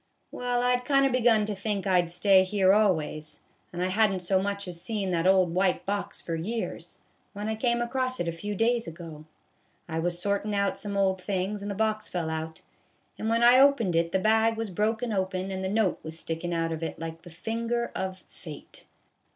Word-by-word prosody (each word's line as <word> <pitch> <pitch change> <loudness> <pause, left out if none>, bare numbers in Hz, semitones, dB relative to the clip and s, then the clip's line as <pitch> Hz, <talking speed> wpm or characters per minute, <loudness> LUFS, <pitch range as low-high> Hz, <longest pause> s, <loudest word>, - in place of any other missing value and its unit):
Well, 245 0 -1
I 250 0 +3
'd 250 - -10
kind 275 +1 +3
of 270 - +2
begun 235 -4 +3
to 210 - -3
think 200 0 -3
I 185 -2 +4
'd 175 - -7
stay 185 +2 +4
here 190 0 +3
always, 160 -7 0 0.3
and 175 0 -3
I - - -1
had 215 +2 +3
n't 185 -2 -3
so 190 +1 +2
much 200 0 -3
as 170 -1 -5
seen 195 -1 -2
that 170 0 +1
old 185 -3 +4
white 185 0 +1
box 200 +1 -3
for 165 - -5
years, 210 +8 -4 0.4
when 205 +1 -5
I 220 - 0
come 235 +1 +1
across 255 +1 -1
it 175 - -1
a - - 0
few 205 +5 -5
days 230 +3 +1
ago. 165 -2 -9 0.6
I 160 -1 -3
was 175 +1 -1
sortin' 200 +2 -1
out 200 -1 0
some 200 -1 -4
old 190 -1 +1
things, 195 +2 -2
and 205 - -5
the 200 - -3
box 215 0 0
fell 165 -3 -3
out, 160 0 -5 0.6
and 220 - -2
when 230 +1 +2
I 245 +2 +7
opened 270 -10 +4
it 170 0 +1
the - - +2
bag 220 +3 +3
was 225 -3 -3
broken 220 +4 -1
open, 190 -1 -2
and 190 0 -4
the 190 - -1
note 210 -2 +1
was 160 0 -7
stickin' 165 +1 -4
out 165 -1 -1
of 160 0 -4
it 165 - -4
like 165 0 -7
the 175 - -12
finger 230 +7 -3
of 190 -1 -4
fate. 155 -4 -12
195 Hz, 220 wpm, -27 LUFS, 175-220 Hz, 0.6 s, I